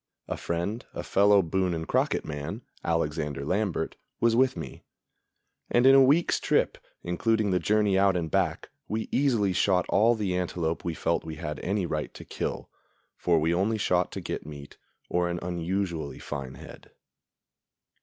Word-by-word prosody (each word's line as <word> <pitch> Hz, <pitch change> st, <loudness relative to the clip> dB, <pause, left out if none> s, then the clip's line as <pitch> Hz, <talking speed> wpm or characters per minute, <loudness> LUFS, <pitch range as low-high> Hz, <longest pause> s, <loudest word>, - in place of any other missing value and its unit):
A -, -, -2 dB
friend, 85 Hz, +8 st, -3 dB
a -, -, -4 dB
fellow 100 Hz, 0 st, +4 dB
Boone 90 Hz, +1 st, 0 dB
and 80 Hz, 0 st, -5 dB
Crockett -, -, +1 dB
man, 75 Hz, -2 st, -5 dB, 0.2 s
Alexander 75 Hz, -4 st, -1 dB
Lambert, 90 Hz, -2 st, -1 dB, 0.2 s
was 115 Hz, -1 st, +3 dB
with 130 Hz, +1 st, +3 dB
me; 65 Hz, -, -8 dB, 0.9 s
and 120 Hz, +1 st, +3 dB
in 135 Hz, -, +8 dB
a 135 Hz, -, +8 dB
week's 145 Hz, +6 st, +4 dB
trip, -, -, +1 dB, 0.2 s
including 105 Hz, +4 st, +1 dB
the 90 Hz, -, +2 dB
journey 100 Hz, +2 st, +2 dB
out 95 Hz, -2 st, +4 dB
and 80 Hz, -2 st, -3 dB
back, 95 Hz, 0 st, 0 dB, 0.2 s
we 110 Hz, +1 st, -3 dB
easily 115 Hz, -9 st, +2 dB
shot 90 Hz, -1 st, +2 dB
all 115 Hz, +4 st, +4 dB
the 100 Hz, -4 st, -1 dB
antelope 85 Hz, -2 st, -2 dB
we 85 Hz, -2 st, -2 dB
felt 85 Hz, -, 0 dB
we 80 Hz, -1 st, -6 dB
had 75 Hz, -1 st, -5 dB
any 100 Hz, 0 st, -1 dB
right 75 Hz, -2 st, -3 dB
to -, -, -10 dB
kill; -, -, -4 dB, 0.5 s
for 85 Hz, -2 st, +2 dB
we 80 Hz, +2 st, +1 dB
only 100 Hz, +5 st, +1 dB
shot 90 Hz, -3 st, +1 dB
to -, -, -4 dB
get -, -, -4 dB
meat, 70 Hz, -1 st, -10 dB, 0.3 s
or 90 Hz, 0 st, 0 dB
an 85 Hz, -, -2 dB
unusually 85 Hz, -4 st, -2 dB
fine 70 Hz, -3 st, -6 dB
head. -, -, -12 dB
90 Hz, 165 wpm, -27 LUFS, 80-105 Hz, 0.9 s, in